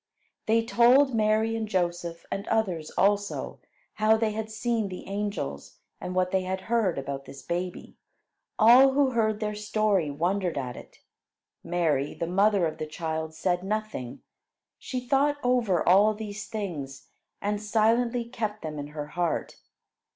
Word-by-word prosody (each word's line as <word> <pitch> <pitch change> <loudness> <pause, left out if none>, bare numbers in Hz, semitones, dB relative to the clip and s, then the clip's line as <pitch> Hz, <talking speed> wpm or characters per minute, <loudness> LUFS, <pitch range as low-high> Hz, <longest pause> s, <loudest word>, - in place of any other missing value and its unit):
They 225 +1 +3
told 250 +4 +5
Mary 220 0 +2
and 225 -1 -2
Joseph, 175 -3 -2
and 200 - -3
others 185 -9 0
also, 205 +1 0 0.3
how 215 +1 +3
they 220 -1 0
had 220 +1 -4
seen 225 -1 -1
the 185 - -8
angels, 205 +1 -4 0.2
and 180 0 -5
what 185 0 +1
they 190 - +2
had 185 +1 -3
heard 220 -4 0
about 135 0 -5
this 135 - -11
baby. 180 +1 -4 0.6
All 250 +5 +7
who 275 -1 +3
heard 220 -3 +1
their 210 -1 -2
story 210 -5 0
wondered 175 +3 -1
at 125 -3 -3
it; - - -13 0.6
Mary, 160 -5 0
the 170 - -2
mother 195 +1 +3
of 160 0 -4
the 155 - -3
child, 160 0 -4
said 175 +2 0
nothing. 210 - -4 0.6
She 250 -1 -5
thought 285 +2 +2
over 235 -9 +1
all 205 +4 +5
these 215 0 -6
things, 155 -11 -6 0.3
and 205 0 -2
silently 230 +3 +2
kept 215 -4 -4
them 155 -2 -5
in 145 - -5
her 150 0 -6
heart. 175 +1 -2
205 Hz, 150 wpm, -27 LUFS, 170-220 Hz, 0.6 s, All